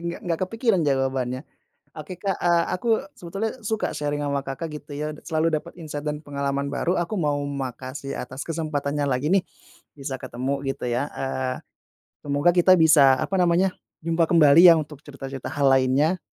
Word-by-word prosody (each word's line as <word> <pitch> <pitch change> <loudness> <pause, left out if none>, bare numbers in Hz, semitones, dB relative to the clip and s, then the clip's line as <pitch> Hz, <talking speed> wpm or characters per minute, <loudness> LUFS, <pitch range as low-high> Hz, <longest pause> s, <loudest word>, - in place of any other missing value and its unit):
ngg - - -13
nggak 170 -2 -2
kepikiran 225 -1 +1
jawabannya. 135 -1 0 0.5
Oke, 155 +4 -7
Kak, 195 -2 0
eee, 170 -1 +4
aku 185 +6 -4 0.3
sebetulnya 195 +6 -3
suka 220 0 -1
sharing 145 0 -2
sama 140 -1 -1
Kakak 135 +5 -4
gitu 145 0 -10
ya, 150 +1 -3 0.2
selalu 160 +1 0
dapat - - -10
insight 150 -3 -6
dan 150 0 -2
pengalaman 140 -1 -2
baru, 155 +5 0
aku 175 +5 -2
mau 145 -3 0
makasih 135 -1 -5
atas 130 +3 -6
kesempatannya 150 -3 -2
lagi 140 +7 0
nih, 195 - +4 0.6
bisa 135 -2 -5
ketemu 130 +2 -3
gitu 135 - -3
ya, 120 +3 -1
eee, 130 -1 -2 0.7
semoga 145 +4 +2
kita 180 +1 +6
bisa, 145 -5 +6
apa 190 +6 -1
namanya, 180 +2 +3 0.3
jumpa 165 -1 +2
kembali 165 +1 +8
ya 170 - +8
untuk 150 -2 -5
cerita-cerita 135 -3 -8
hal 145 -1 0
lainnya. 135 +7 +3
145 Hz, 165 wpm, -24 LUFS, 135-170 Hz, 0.7 s, kembali